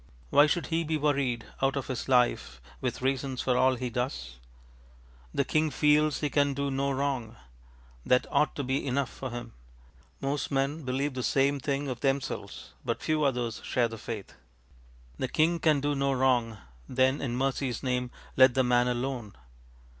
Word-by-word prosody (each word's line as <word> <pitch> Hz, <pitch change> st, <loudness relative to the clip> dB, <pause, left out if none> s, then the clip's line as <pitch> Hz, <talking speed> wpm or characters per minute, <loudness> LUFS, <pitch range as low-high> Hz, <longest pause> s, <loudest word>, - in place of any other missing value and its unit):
Why 145 Hz, +1 st, +7 dB
should 170 Hz, +3 st, 0 dB
he 165 Hz, +1 st, +2 dB
be 160 Hz, 0 st, -1 dB
worried 140 Hz, -6 st, 0 dB, 0.2 s
out 135 Hz, +1 st, +2 dB
of 140 Hz, -, -2 dB
his 130 Hz, 0 st, -4 dB
life 125 Hz, -, +2 dB, 0.2 s
with -, -, -3 dB
reasons 135 Hz, -1 st, -1 dB
for 125 Hz, -, +1 dB
all 130 Hz, +1 st, +4 dB
he 125 Hz, 0 st, -4 dB
does? 65 Hz, -, -4 dB, 0.9 s
The 140 Hz, -, 0 dB
king 155 Hz, +2 st, +1 dB
feels 150 Hz, +1 st, +3 dB
he 150 Hz, -, 0 dB
can 145 Hz, -1 st, +2 dB
do 140 Hz, 0 st, -1 dB
no 135 Hz, +1 st, 0 dB
wrong. 135 Hz, -4 st, -2 dB, 0.7 s
That 125 Hz, -, +3 dB
ought 150 Hz, -, +2 dB
to 145 Hz, -, -2 dB
be 135 Hz, +2 st, -1 dB
enough 135 Hz, 0 st, 0 dB
for 130 Hz, -, -6 dB
him. 120 Hz, -1 st, -7 dB, 0.7 s
Most 140 Hz, +1 st, -2 dB
men 140 Hz, +2 st, -1 dB
believe 135 Hz, +2 st, -1 dB
the 130 Hz, -, -3 dB
same 140 Hz, +3 st, +2 dB
thing 140 Hz, +1 st, -2 dB
of 125 Hz, -3 st, -4 dB
themselves, 135 Hz, 0 st, -3 dB
but -, -, -3 dB
few 155 Hz, -1 st, +1 dB
others 125 Hz, -4 st, -1 dB
share 120 Hz, -2 st, +1 dB
the 115 Hz, -1 st, -8 dB
faith. 110 Hz, -4 st, -6 dB, 0.9 s
The 130 Hz, -, 0 dB
king 165 Hz, +5 st, +2 dB
can 155 Hz, -4 st, +3 dB
do 145 Hz, +1 st, 0 dB
no 140 Hz, -1 st, +1 dB
wrong, 125 Hz, -4 st, +2 dB, 0.3 s
then 130 Hz, +2 st, +2 dB
in 125 Hz, -3 st, -2 dB
mercyŌĆÖs 135 Hz, -2 st, -1 dB
name 125 Hz, -1 st, -1 dB, 0.3 s
let 130 Hz, -1 st, +6 dB
the 130 Hz, -, +4 dB
man 125 Hz, 0 st, +3 dB
alone. 125 Hz, -3 st, -3 dB
135 Hz, 175 wpm, -29 LUFS, 125-140 Hz, 0.9 s, Why